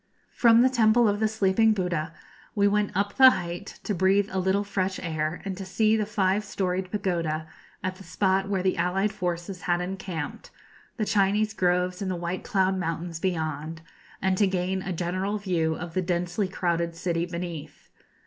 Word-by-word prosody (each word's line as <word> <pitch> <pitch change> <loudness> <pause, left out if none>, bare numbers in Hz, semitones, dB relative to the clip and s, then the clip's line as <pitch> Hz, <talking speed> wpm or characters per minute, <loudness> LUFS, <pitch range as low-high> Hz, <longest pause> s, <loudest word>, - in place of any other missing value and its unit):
] - - -39
From 235 0 +6
the 260 - +5
Temple 230 -1 +4
of 205 0 +1
the 220 - +3
Sleeping 215 +1 +3
Buddha 175 -5 -2 0.4
we 200 -1 +4
went 210 0 +2
up 200 +1 0
the 260 -1 +10
height 175 -6 -4
to 210 - -1
breathe 195 +2 +2
a 190 - -1
little 190 +2 +1
fresh 190 -2 -2
air, 160 -1 -3
and 195 -1 -3
to 195 - -5
see 215 +4 +2
the 215 -2 0
five 205 -1 +1
storied 185 -2 -2
pagoda 170 -6 -2 0.4
at 185 0 -3
the 195 - -12
spot 195 0 0
where 190 -2 0
the 185 - +1
allied 195 +3 +1
forces 175 0 -4
had 175 +1 +1
encamped, 180 -4 -5 0.5
the 215 - 0
Chinese 210 +1 +2
groves 180 -1 +1
in 195 - -2
the 185 - -1
White 175 +1 -4
Cloud 190 -3 +1
Mountains 165 -1 -3
beyond, 160 -2 -3 0.4
and 190 -1 +1
to 205 - +5
gain 190 0 -1
a 190 - -4
general 185 +4 -2
view 170 -6 0
of 170 0 -7
the 185 - +1
densely 180 +2 -1
crowded 170 -2 -1
city 170 0 -1
beneath. 170 -4 -7
185 Hz, 185 wpm, -26 LUFS, 175-200 Hz, 0.5 s, the